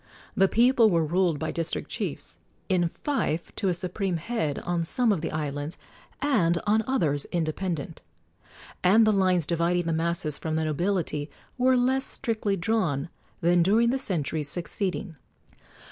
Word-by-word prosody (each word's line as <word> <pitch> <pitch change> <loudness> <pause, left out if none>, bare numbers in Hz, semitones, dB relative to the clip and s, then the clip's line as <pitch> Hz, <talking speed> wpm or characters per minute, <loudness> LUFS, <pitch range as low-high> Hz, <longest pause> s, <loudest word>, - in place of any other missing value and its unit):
The 195 - +4
people 235 +1 +4
were 165 -4 +2
ruled 175 0 +1
by 155 +2 -3
district 165 -1 -3
chiefs, - - -4 0.3
in 175 -3 +2
fief 175 - -2
to 195 - -1
a 180 - +2
supreme 180 +1 -2
head 165 -5 -2
on 175 -1 -1
some 240 +7 +1
of 190 -6 0
the 160 - -3
islands, 150 +1 -4 0.5
and 175 -12 +2
on 215 +1 +3
others 155 - +1
independent, 165 -1 -3 0.8
and 210 +5 +6
the 215 - +4
lines 185 -4 +2
dividing 170 +2 +1
the 165 - 0
masses 165 -2 -1
from 160 -1 -2
the 160 0 0
nobility 155 -2 -1 0.3
were 255 0 +3
less 260 +2 +2
strictly 220 -3 -1
drawn 170 -7 0 0.3
than 175 +1 +4
during 220 +7 +3
the 265 - 0
centuries 155 - -1
succeeding. 180 +1 -3
175 Hz, 150 wpm, -26 LUFS, 160-215 Hz, 0.8 s, and